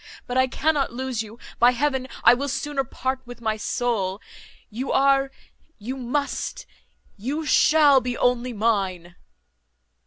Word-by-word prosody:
But 245 Hz, -, -5 dB
I 260 Hz, 0 st, +4 dB
cannot 290 Hz, +2 st, 0 dB
lose 255 Hz, -1 st, -3 dB
you. 220 Hz, +1 st, -10 dB, 0.2 s
By 245 Hz, +1 st, +6 dB
heaven, 265 Hz, 0 st, -1 dB, 0.2 s
I -, -, +8 dB
will 275 Hz, +3 st, -2 dB
sooner 280 Hz, +1 st, -2 dB
part 260 Hz, +1 st, -3 dB
with 245 Hz, 0 st, -10 dB
my 220 Hz, -2 st, -1 dB
soul! 210 Hz, -4 st, -2 dB, 0.5 s
You 250 Hz, +5 st, -4 dB
are, 275 Hz, 0 st, +3 dB, 0.5 s
you 235 Hz, +5 st, -5 dB
must, 270 Hz, +3 st, -3 dB, 0.5 s
you 280 Hz, +10 st, -3 dB
shall 295 Hz, -3 st, +5 dB
be 245 Hz, -1 st, -3 dB
only 245 Hz, 0 st, +1 dB
mine." 195 Hz, -6 st, -1 dB
250 Hz, 135 wpm, -24 LUFS, 230-270 Hz, 0.5 s, I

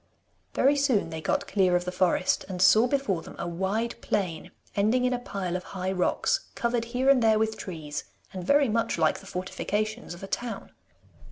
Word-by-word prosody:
Very 275 Hz, +3 st, +4 dB
soon 260 Hz, -, +1 dB
they 160 Hz, 0 st, -5 dB
got 285 Hz, -, 0 dB
clear 185 Hz, -3 st, +3 dB
of 180 Hz, 0 st, 0 dB
the 180 Hz, -, -2 dB
forest, 185 Hz, 0 st, +1 dB
and 185 Hz, -1 st, -4 dB
saw 215 Hz, +6 st, +6 dB
before 245 Hz, -11 st, 0 dB
them -, -, -11 dB
a -, -, -4 dB
wide 190 Hz, +7 st, -1 dB
plain 180 Hz, -6 st, -2 dB, 0.3 s
ending 220 Hz, +5 st, +2 dB
in 250 Hz, -, +2 dB
a 245 Hz, -, -1 dB
pile 195 Hz, -6 st, -4 dB
of 180 Hz, -, -2 dB
high 185 Hz, -1 st, -4 dB
rocks, 190 Hz, -, +1 dB, 0.2 s
covered 235 Hz, -1 st, 0 dB
here 250 Hz, +3 st, -1 dB
and 275 Hz, -2 st, +6 dB
there 220 Hz, -1 st, +4 dB
with 220 Hz, 0 st, 0 dB
trees, 155 Hz, -7 st, -6 dB, 0.3 s
and 185 Hz, -1 st, -5 dB
very 280 Hz, +8 st, +4 dB
much 230 Hz, -2 st, 0 dB
like 160 Hz, -2 st, +2 dB
the 195 Hz, -, -14 dB
fortifications 205 Hz, +3 st, -3 dB
of 175 Hz, -, -13 dB
a -, -, -5 dB
town. 240 Hz, +3 st, -4 dB
205 Hz, 195 wpm, -27 LUFS, 180-240 Hz, 0.3 s, saw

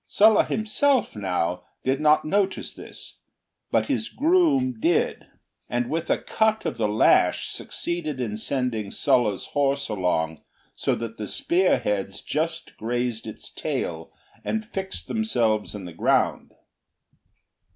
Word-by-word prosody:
Sulla 215 Hz, +1 st, +5 dB
himself, 240 Hz, -, +1 dB
now, 90 Hz, -3 st, -1 dB, 0.2 s
did 135 Hz, +3 st, +1 dB
not 150 Hz, 0 st, +4 dB
notice 195 Hz, +3 st, 0 dB
this, -, -, -9 dB, 0.5 s
but -, -, +2 dB
his 270 Hz, -5 st, -1 dB
groom 285 Hz, -6 st, +2 dB
did, 335 Hz, +6 st, +1 dB, 0.4 s
and 120 Hz, 0 st, -1 dB
with 165 Hz, +1 st, -2 dB
a -, -, +3 dB
cut 220 Hz, 0 st, +1 dB
of -, -, -3 dB
the 110 Hz, -, +2 dB
lash 105 Hz, -3 st, +3 dB
succeeded 155 Hz, -5 st, -3 dB
in 110 Hz, -4 st, -2 dB
sending 110 Hz, -2 st, -2 dB
Sulla's 120 Hz, -8 st, +1 dB
horse 140 Hz, -2 st, +1 dB
along 85 Hz, -6 st, 0 dB, 0.3 s
so -, -, 0 dB
that 115 Hz, -1 st, -6 dB
the 105 Hz, -, -3 dB
spear 180 Hz, -, +2 dB
heads 100 Hz, -1 st, -2 dB
just 160 Hz, +2 st, -2 dB
grazed 120 Hz, 0 st, -2 dB
its 110 Hz, -, -9 dB
tail 80 Hz, -1 st, -3 dB, 0.3 s
and 220 Hz, 0 st, -2 dB
fixed 190 Hz, -3 st, -5 dB
themselves 115 Hz, -, 0 dB
in 100 Hz, -3 st, -7 dB
the 90 Hz, -, -8 dB
ground. -, -, +1 dB
130 Hz, 130 wpm, -25 LUFS, -, 0.5 s, Sulla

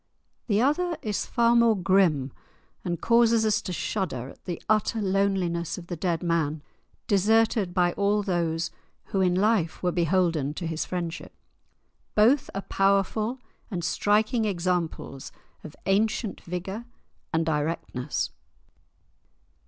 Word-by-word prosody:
The 205 Hz, -3 st, +2 dB
other 330 Hz, +5 st, +1 dB
is 210 Hz, -2 st, -2 dB
far 235 Hz, 0 st, +3 dB
more 230 Hz, -2 st, +5 dB
grim, 175 Hz, -8 st, +2 dB, 0.5 s
and 170 Hz, -2 st, -2 dB
causes 230 Hz, -1 st, +4 dB
us 215 Hz, -1 st, +2 dB
to 185 Hz, -, -5 dB
shudder 175 Hz, -, -3 dB
at -, -, -16 dB
the 175 Hz, -2 st, -4 dB
utter 215 Hz, +1 st, +2 dB
loneliness 190 Hz, -4 st, 0 dB
of 175 Hz, -, -8 dB
the 175 Hz, -, -5 dB
dead 170 Hz, 0 st, -1 dB
man, 160 Hz, -3 st, 0 dB, 0.4 s
deserted 215 Hz, -1 st, +3 dB
by 175 Hz, -1 st, +2 dB
all 205 Hz, +1 st, +1 dB
those 170 Hz, -3 st, -1 dB, 0.4 s
who 195 Hz, -, 0 dB
in 180 Hz, -1 st, +3 dB
life 195 Hz, -4 st, +1 dB
were 180 Hz, -, +2 dB
beholden 170 Hz, -4 st, +1 dB
to 175 Hz, -, -4 dB
his 160 Hz, -1 st, -2 dB
friendship. 170 Hz, -2 st, -5 dB, 0.8 s
Both 255 Hz, +7 st, +4 dB
are 195 Hz, -, -2 dB
powerful 200 Hz, +5 st, +1 dB, 0.3 s
and 180 Hz, -6 st, -4 dB
striking 215 Hz, +6 st, +2 dB
examples 175 Hz, -7 st, -2 dB, 0.3 s
of 155 Hz, -, -10 dB
ancient 210 Hz, +1 st, 0 dB
vigour 190 Hz, +6 st, -5 dB, 0.5 s
and 160 Hz, 0 st, +1 dB
directness. 150 Hz, -3 st, -2 dB
185 Hz, 130 wpm, -26 LUFS, 170-215 Hz, 0.8 s, more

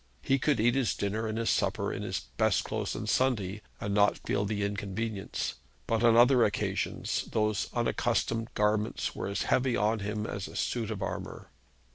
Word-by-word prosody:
He 135 Hz, 0 st, +2 dB
could 145 Hz, -3 st, +2 dB
eat 120 Hz, +2 st, +4 dB
his 130 Hz, -8 st, +1 dB
dinner 110 Hz, +3 st, -1 dB
and 110 Hz, 0 st, -3 dB
his 115 Hz, 0 st, +1 dB
supper -, -, 0 dB
in -, -, -4 dB
his -, -, -2 dB
best -, -, +2 dB
clothes -, -, -3 dB
on -, -, -4 dB
Sunday, 105 Hz, -6 st, +1 dB, 0.2 s
and 100 Hz, 0 st, -2 dB
not 105 Hz, 0 st, +4 dB
feel 100 Hz, -, 0 dB
the 105 Hz, 0 st, -1 dB
inconvenience; 100 Hz, +1 st, -3 dB, 0.3 s
but 115 Hz, 0 st, 0 dB
on 115 Hz, -1 st, +6 dB
other 120 Hz, +1 st, +6 dB
occasions 100 Hz, -, -1 dB
those 105 Hz, -2 st, 0 dB
unaccustomed 115 Hz, -1 st, 0 dB
garments 105 Hz, +1 st, +1 dB
were -, -, -3 dB
as 100 Hz, -, -1 dB
heavy 130 Hz, -1 st, +2 dB
to 110 Hz, +1 st, +2 dB
him 105 Hz, +1 st, -3 dB
as 100 Hz, -3 st, -4 dB
a -, -, -11 dB
suit 115 Hz, -3 st, -1 dB
of 105 Hz, -3 st, -3 dB
armour. 95 Hz, -, -6 dB
110 Hz, 180 wpm, -30 LUFS, 100-115 Hz, 0.3 s, on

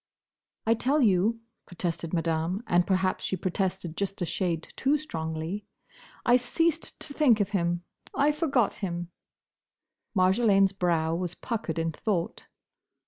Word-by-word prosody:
"I 225 Hz, -, +5 dB
tell 265 Hz, +6 st, +1 dB
you," 215 Hz, +2 st, +3 dB, 0.3 s
protested 170 Hz, -2 st, -3 dB
Madame—and 175 Hz, +2 st, +1 dB
perhaps 185 Hz, -1 st, +1 dB
she -, -, -1 dB
protested 185 Hz, -1 st, -2 dB
just 195 Hz, +1 st, -3 dB
a 175 Hz, -, 0 dB
shade 170 Hz, -2 st, -2 dB
too 280 Hz, +3 st, +2 dB
strongly—"I 195 Hz, -, -3 dB
ceased 325 Hz, +6 st, 0 dB
to 285 Hz, -, -4 dB
think 265 Hz, -8 st, +4 dB
of 205 Hz, -2 st, +1 dB
him. 175 Hz, -3 st, 0 dB, 0.3 s
I 290 Hz, +2 st, +4 dB
forgot 280 Hz, -, +1 dB
him." 175 Hz, -3 st, -4 dB, 1.0 s
Marjolaine's 195 Hz, +1 st, +4 dB
brow 170 Hz, -4 st, +1 dB
was 175 Hz, 0 st, -2 dB
puckered 210 Hz, -9 st, -3 dB
in 165 Hz, 0 st, 0 dB
thought. 175 Hz, +1 st, -2 dB
190 Hz, 125 wpm, -28 LUFS, 170-230 Hz, 1.0 s, I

